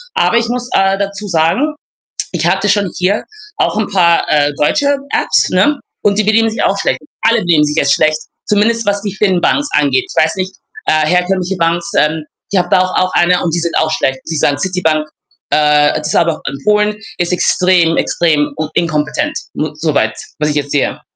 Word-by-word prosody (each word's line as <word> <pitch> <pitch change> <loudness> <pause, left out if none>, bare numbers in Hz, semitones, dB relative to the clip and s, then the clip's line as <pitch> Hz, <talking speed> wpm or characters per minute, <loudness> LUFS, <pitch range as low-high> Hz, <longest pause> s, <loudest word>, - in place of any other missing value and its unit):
Aber 350 - +2
ich 230 0 0
muss, 245 +1 -3
äh, 195 0 +2
dazu 200 +1 -4
sagen, 190 - +1 0.6
ich - - -2
hatte 195 +2 +1
schon 200 -1 +1
hier 190 +3 0 0.3
auch - - 0
'n 215 - 0
paar, 170 -3 +3
äh, 145 -1 +2
deutsche 285 - +1
Apps, - - +1
ne, 290 -1 +2 0.2
und 200 -1 +2
die 215 - +2
benehmen 220 +2 +3
sich 220 - -3
auch - - +1
schlecht. - - 0 0.2
Alle 230 0 +3
benehmen 165 -5 +3
sich 150 0 -2
jetzt 140 -2 +3
schlecht, 155 0 +2 0.3
zumindest 225 +2 +1
was 205 0 0
die 205 -2 -5
Fin-Banken 210 +8 +1
angeht. 375 +7 +1
Ich - - +2
weiß - - -1
nicht, 185 0 -3 0.3
äh, 155 -1 +2
herkömmliche 180 +2 0
Banken, 170 +2 0
ähm, 155 +1 +1 0.3
ich 200 - +1
habe 175 0 -2
da 185 - +4
auch 185 - -3
auch 185 0 0
eine 180 +1 +3
und 165 - -1
die 170 - +1
sind 170 0 -1
auch 155 - +1
schlecht. 135 -4 -1
Sie 160 - -3
sagen, 145 -1 +1
Citybank, 160 -2 0 0.5
äh, 150 -1 +3
das 150 - -4
ist - - -2
aber 165 -2 +2
auch - - -18
in 140 - -6
Polen, 210 0 +2 0.2
ist 175 0 -1
extrem, 180 -2 +2
extrem 150 -4 +1
u 155 -1 -3
inkompetent 165 - -1 0.2
mo 155 -1 -3
so 155 0 -1
weit, 110 -5 +1 0.2
was 150 - +1
ich 150 - -2
jetzt 145 -1 -2
sehe. 145 - -1
180 Hz, 205 wpm, -14 LUFS, 155-205 Hz, 0.6 s, da